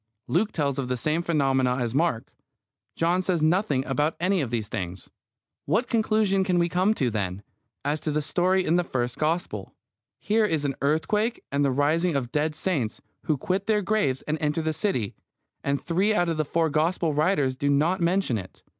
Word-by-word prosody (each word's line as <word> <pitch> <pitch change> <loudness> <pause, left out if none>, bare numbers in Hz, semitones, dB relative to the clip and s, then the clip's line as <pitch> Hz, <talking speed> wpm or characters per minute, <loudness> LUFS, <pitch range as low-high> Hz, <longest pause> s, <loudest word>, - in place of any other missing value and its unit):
Luke 205 +6 +1
tells 140 -3 -1
of 130 - -2
the 125 0 -1
same 155 +6 0
phenomena 135 -6 +1
as 120 -3 -2
Mark; 145 -5 0 0.6
John 175 +3 +2
says 180 -4 0
nothing 155 -5 +2
about 145 +4 0
any 185 +1 +2
of 130 - -2
these 115 -3 -2
things. 95 -4 -6 0.6
What 215 - +1
conclusion 215 -4 +2
can 185 -2 +1
we 170 0 +2
come 185 +5 +2
to, 125 - 0
then, 100 -2 -3 0.4
as 150 +2 0
to 155 - -3
the 150 0 0
story 185 +4 +1
in 170 - +3
the 175 - +2
first 125 -5 -3
Gospel? 165 +3 -2 0.4
Here 220 +2 +2
is 160 -8 0
an 140 - 0
earthquake 210 - 0
and 140 +1 +1
the 140 - +3
rising 155 +5 +1
of 125 -3 -2
dead 150 +1 0
saints, 150 - -1 0.3
who 155 - +1
quit 190 +8 -2
their 210 -2 +2
graves 180 -11 0
and 155 +1 -2
enter 150 +1 0
the 160 0 0
city, 145 - -1 0.5
and 140 0 0
three 190 +6 +1
out 175 -2 +2
of 165 - -1
the 155 - 0
four 165 +1 0
Gospel 160 +1 +1
writers 150 -4 +1
do 140 +2 -1
not 160 +7 +2
mention 170 - +1
it. 95 - -12
155 Hz, 195 wpm, -26 LUFS, 135-185 Hz, 0.6 s, in